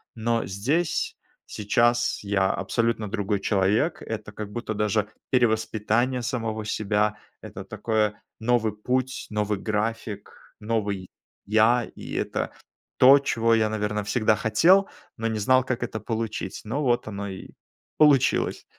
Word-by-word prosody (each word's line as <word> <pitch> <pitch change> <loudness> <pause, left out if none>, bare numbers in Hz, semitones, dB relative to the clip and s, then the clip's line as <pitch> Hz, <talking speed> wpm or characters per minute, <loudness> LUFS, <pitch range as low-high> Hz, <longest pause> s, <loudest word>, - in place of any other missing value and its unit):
но 115 0 0
здесь, 140 - -1 0.3
сейчас, 120 +3 +1
я 100 -1 +1
абсолютно 110 +2 -1
другой 105 -1 -1
человек. 105 - +1
Это 110 -2 -6
как 105 0 -7
будто 115 0 -4
даже 105 0 0 0.2
перевоспитание 120 +1 +1
самого 115 -2 -3
себя, 105 0 0 0.2
это - - -8
такое- 105 -2 -1 0.2
новый 115 -1 +1
путь, 130 +4 -2
новый 105 -1 0
график, 105 -1 -4
новый 105 -4 -2 0.4
я. 110 +4 +4
И - - -8
это - - -2 0.5
то, 135 +2 +8
чего 115 -4 +1
я, 110 -1 +2
наверно, 105 -1 -2
всегда 110 +1 +2
хотел, 170 - +4 0.3
но 115 - -1
не 110 -1 -2
знал, 130 +5 +3
как 130 -2 -2
это 110 -2 -4
получить, 115 -2 -4
но 130 +8 -2
вот 120 -4 +1
оно 100 -1 -5
и 95 - -8 0.5
получилось. 140 -4 +3
110 Hz, 130 wpm, -25 LUFS, 105-120 Hz, 0.5 s, то